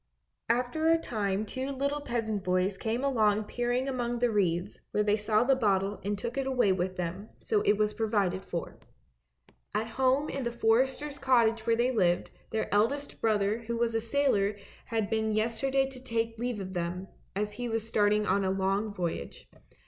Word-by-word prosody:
After 250 Hz, +7 st, +1 dB
a 330 Hz, -, +6 dB
time 210 Hz, -8 st, -2 dB
two 260 Hz, +5 st, -4 dB
little 280 Hz, +2 st, -1 dB
peasant 220 Hz, -6 st, -2 dB
boys 185 Hz, +1 st, +1 dB
came 225 Hz, +5 st, -2 dB
along 215 Hz, -6 st, +2 dB
peering 245 Hz, +4 st, -1 dB
among 240 Hz, -2 st, -1 dB
the 240 Hz, 0 st, +2 dB
reeds 185 Hz, -2 st, 0 dB
where 210 Hz, -, +1 dB
they 210 Hz, 0 st, +3 dB
saw 215 Hz, +1 st, +2 dB
the 270 Hz, +2 st, +4 dB
bottle 200 Hz, -4 st, +1 dB
and 205 Hz, +1 st, -1 dB
took 235 Hz, +6 st, -3 dB
it 270 Hz, -, -1 dB
away 250 Hz, -6 st, +3 dB
with 185 Hz, 0 st, -1 dB
them, 180 Hz, +4 st, -4 dB
so 430 Hz, -2 st, +1 dB
it 205 Hz, -, +3 dB
was 210 Hz, 0 st, +1 dB
provided 200 Hz, -5 st, 0 dB
for. 170 Hz, -, -5 dB, 1.0 s
At 215 Hz, +1 st, +1 dB, 0.2 s
home 265 Hz, +3 st, +3 dB
in 275 Hz, -, -3 dB
the 235 Hz, -, -1 dB
forester's 265 Hz, +6 st, +1 dB
cottage 230 Hz, -4 st, +3 dB
where 230 Hz, -, +4 dB
they 240 Hz, +2 st, +2 dB
lived, 180 Hz, -6 st, +1 dB, 0.2 s
their 220 Hz, -, -1 dB
eldest 275 Hz, +8 st, 0 dB
brother 215 Hz, 0 st, +2 dB
who 230 Hz, 0 st, -4 dB
was 235 Hz, 0 st, +1 dB
a 225 Hz, -, +1 dB
sailor 225 Hz, -5 st, +1 dB, 0.3 s
had 225 Hz, -3 st, -1 dB
been 220 Hz, -1 st, +1 dB
yesterday 250 Hz, +5 st, +1 dB
to 260 Hz, -2 st, -10 dB
take 225 Hz, -2 st, -2 dB
leave 240 Hz, -2 st, -2 dB
of 190 Hz, -1 st, -6 dB
them, 180 Hz, +1 st, -3 dB, 0.3 s
as 210 Hz, +1 st, -1 dB
he 245 Hz, +1 st, -4 dB
was 225 Hz, -1 st, -2 dB
starting 210 Hz, -1 st, +2 dB
on 200 Hz, -1 st, +2 dB
a 190 Hz, -, +1 dB
long 195 Hz, +3 st, 0 dB
voyage. 175 Hz, -, -4 dB
220 Hz, 185 wpm, -29 LUFS, 200-245 Hz, 1.0 s, a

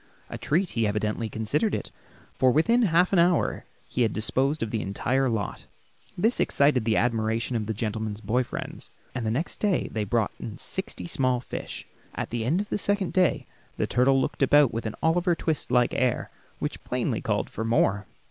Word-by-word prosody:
A -, -, -4 dB
treat 175 Hz, +5 st, +1 dB
he 115 Hz, -2 st, +1 dB
evidently 105 Hz, +2 st, -1 dB
considered 110 Hz, -, 0 dB
it, -, -, -5 dB, 0.4 s
for 130 Hz, 0 st, +3 dB
within 230 Hz, -, +3 dB
half 180 Hz, -3 st, +3 dB
an 185 Hz, -, +5 dB
hour 175 Hz, 0 st, +2 dB, 0.2 s
he 125 Hz, -, -2 dB
had 115 Hz, -3 st, +2 dB
disposed 135 Hz, +6 st, +1 dB
of 110 Hz, -, -4 dB
the 110 Hz, -, -1 dB
entire 130 Hz, +7 st, 0 dB
lot. 110 Hz, -5 st, -3 dB, 0.5 s
This 225 Hz, +7 st, +2 dB
excited 140 Hz, -5 st, +3 dB
the 110 Hz, -1 st, +2 dB
admiration 115 Hz, 0 st, 0 dB
of 110 Hz, -2 st, -1 dB
the 110 Hz, -, -1 dB
gentleman's 110 Hz, -1 st, -3 dB
boy 110 Hz, +4 st, +1 dB
friends, -, -, -7 dB, 0.2 s
and 120 Hz, -4 st, -3 dB
the -, -, +1 dB
next 135 Hz, +10 st, -2 dB
day 205 Hz, -4 st, +1 dB
they 110 Hz, -, -1 dB
brought 110 Hz, +1 st, 0 dB
in 110 Hz, -, -7 dB
sixty 195 Hz, +5 st, -5 dB
small 130 Hz, -7 st, +1 dB
fish. 125 Hz, -, -6 dB, 0.3 s
At -, -, -4 dB
the 120 Hz, -1 st, -2 dB
end 165 Hz, +10 st, +2 dB
of 210 Hz, -, -7 dB
the -, -, -1 dB
second 200 Hz, -2 st, 0 dB
day 185 Hz, -4 st, +2 dB, 0.3 s
the -, -, +1 dB
turtle 135 Hz, +2 st, +3 dB
looked 130 Hz, -, -2 dB
about 145 Hz, -1 st, +5 dB
with 115 Hz, 0 st, -3 dB
an 110 Hz, -, -5 dB
Oliver 175 Hz, +2 st, +3 dB
Twist 160 Hz, -2 st, -2 dB
like 125 Hz, -1 st, +3 dB
air, 125 Hz, -2 st, 0 dB, 0.3 s
which -, -, -4 dB
plainly -, -, -1 dB
called -, -, -1 dB
for 110 Hz, -, -4 dB
more. 105 Hz, -3 st, +1 dB
125 Hz, 195 wpm, -26 LUFS, 110-165 Hz, 0.5 s, an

